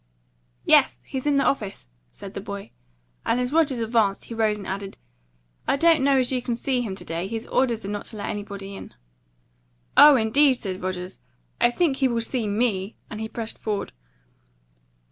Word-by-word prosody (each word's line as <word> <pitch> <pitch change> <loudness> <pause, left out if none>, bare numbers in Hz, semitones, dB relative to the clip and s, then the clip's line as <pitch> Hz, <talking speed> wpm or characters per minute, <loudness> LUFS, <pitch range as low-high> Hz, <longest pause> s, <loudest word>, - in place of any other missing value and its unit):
"Yes, - - +5
he's 265 +2 -4
in 290 - +3
his 275 - +3
office," 205 - -1 0.2
said 195 - -10
the 195 - -5
boy; 200 +1 -7 0.5
and 245 - +1
as 250 +2 -1
Rogers 310 -5 +3
advanced, 220 -3 +1
he - - -8
rose 220 -2 +1
and 200 - -8
added, 195 +1 -5 0.7
"I - - +3
don't 325 -2 +4
know 275 0 +4
as 255 -1 +1
you 255 -1 0
can 240 -1 -2
see 250 +1 -1
him 205 -5 -4
to - - -8
day. 165 +3 -3
His 225 +2 -4
orders 235 -5 0
are - - -4
not 205 0 -4
to 220 - -9
let 205 - -4
anybody 200 -1 -6
in." - - -10 1.0
"Oh, 295 -1 +9
indeed!" 260 +4 +4
said 190 -6 -5
Rogers; 185 0 -5 0.4
"I 240 - +5
think 275 +2 +1
he 265 - +3
will 235 -2 0
see 230 -1 -1
ME!" 205 -2 0 0.2
and 215 -1 -5
he 220 - -4
pressed 225 -1 -6
forward. 210 -2 -3
225 Hz, 190 wpm, -24 LUFS, 200-255 Hz, 1.0 s, Oh